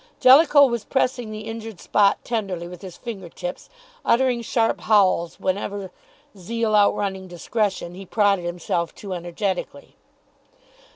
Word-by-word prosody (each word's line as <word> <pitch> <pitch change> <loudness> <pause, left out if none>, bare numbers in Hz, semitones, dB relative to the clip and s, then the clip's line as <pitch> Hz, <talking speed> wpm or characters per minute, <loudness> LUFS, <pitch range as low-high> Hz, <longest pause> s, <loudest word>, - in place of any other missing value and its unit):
Jellicoe 285 +2 +7
was 235 -4 -1
pressing 245 -1 -1
the 215 0 -6
injured 225 -3 -7
spot 200 -1 +3
tenderly 195 -7 -3
with 180 0 -10
his 185 -3 -9
finger 200 -8 -7
tips, 180 +2 -7 0.3
uttering 250 0 +2
sharp 230 0 0
howls 190 -5 +2
whenever, 195 0 -3 0.4
zeal 220 +4 -2
outrunning 200 -2 +1
discretion, 185 0 -2
he 190 +1 -10
prodded 200 -4 +2
himself 170 -1 -2
too 195 -3 -7
energetically. 175 -3 -4
200 Hz, 125 wpm, -23 LUFS, 180-225 Hz, 0.4 s, Jellicoe